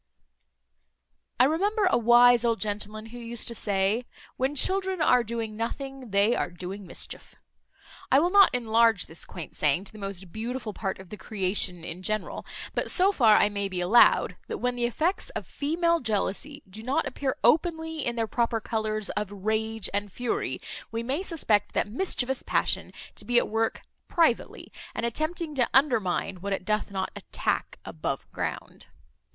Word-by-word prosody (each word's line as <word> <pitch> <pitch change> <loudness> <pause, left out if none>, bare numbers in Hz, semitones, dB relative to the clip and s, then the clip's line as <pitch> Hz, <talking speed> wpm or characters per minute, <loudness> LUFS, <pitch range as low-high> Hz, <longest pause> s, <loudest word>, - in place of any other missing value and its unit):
I - - +8
remember 395 - +2
a 370 - +3
wise 240 +1 +6
old 230 -1 +1
gentleman 210 +1 -4
who 245 - -7
used 235 -1 -5
to - - -5
say, 205 +2 0 0.3
"When 265 +3 -1
children 380 +4 +2
are 250 -5 +4
doing 225 -1 -4
nothing, 265 +3 -5
they 200 +4 +3
are - - -1
doing 180 +3 -7
mischief." - - -6 0.8
I 270 - +7
will 345 +4 +2
not 400 -1 +8
enlarge 230 -4 +3
this 160 - -10
quaint 170 -4 -9
saying 150 +4 +1
to 200 - -10
the 215 - -12
most 195 -3 -6
beautiful 230 +1 -4
part 195 -2 -3
of 190 -2 -13
the 210 - -6
creation 185 -3 0
in 170 +2 -7
general; 215 +2 -3 0.3
but - - -1
so 380 +2 +4
far 230 - +5
I - - +5
may 200 -1 -2
be 185 -1 -4
allowed, 185 +7 +5
that - - -4
when 250 0 -1
the 240 -1 0
effects 315 - 0
of - - -3
female 335 +3 0
jealousy 225 +5 -2
do 200 +4 -8
not 255 +5 0
appear 265 0 -2
openly 320 +3 +2
in 240 - -1
their 230 -1 0
proper 230 0 0
colours 215 -1 -2
of 210 -1 -3
rage 220 +2 -1
and 205 0 -2
fury, 245 +4 -2 0.3
we 230 0 -3
may 270 +8 -1
suspect 225 - 0
that - - +2
mischievous 265 - -1
passion - - 0 0.2
to - - -12
be 245 0 +1
at - - +4
work 225 +1 -1 0.2
privately, 325 -9 +1 0.2
and - - -1
attempting 310 +6 -2
to 250 -4 +1
undermine, 225 -9 +2
what 200 +2 -3
it 190 - -4
doth 215 +1 0
not 190 -1 -3
attack - - -2
above - - -4
ground. - - -5
230 Hz, 170 wpm, -27 LUFS, 205-265 Hz, 0.8 s, I